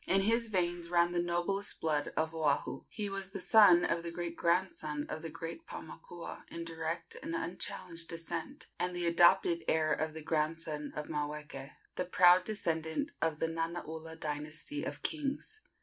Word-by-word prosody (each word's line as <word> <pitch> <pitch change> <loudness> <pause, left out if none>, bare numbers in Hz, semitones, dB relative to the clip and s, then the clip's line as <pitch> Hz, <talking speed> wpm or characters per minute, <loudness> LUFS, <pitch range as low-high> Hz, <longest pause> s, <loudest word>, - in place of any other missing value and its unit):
In 195 +1 +4
his 230 +3 +2
veins 175 -4 0
ran 170 0 +4
the 175 0 +1
noblest 175 +4 -1
blood 150 -2 0
of 160 0 +1
Oahu. 150 -3 0
He 210 -2 -2
was 195 -1 -3
the 195 0 -5
son 185 -3 +7
of 170 - +1
the 170 - -3
great 170 0 -4
grandson 170 -4 0
of 155 - -4
the 165 - -4
great 165 - -7
Paumakua - - -8
in 170 - -5
direct 165 0 -4
and 165 - -3
unchallenged 165 -1 -4
descent, 165 0 -4
and 180 0 -1
the 175 -1 -1
adopted 170 0 +5
heir 155 -1 +3
of 155 0 -1
the 160 - -5
grandson 155 -1 -1
of 150 - -3
Maweke, 150 -2 -4 0.3
the 180 - 0
proud 180 0 +6
descendant 170 - -1
of 160 -2 +1
the 165 - +1
Nanaula 165 -1 -4
dynasty 150 0 -3
of 145 - -5
kings. 305 +7 -2
170 Hz, 165 wpm, -33 LUFS, 160-180 Hz, 0.3 s, son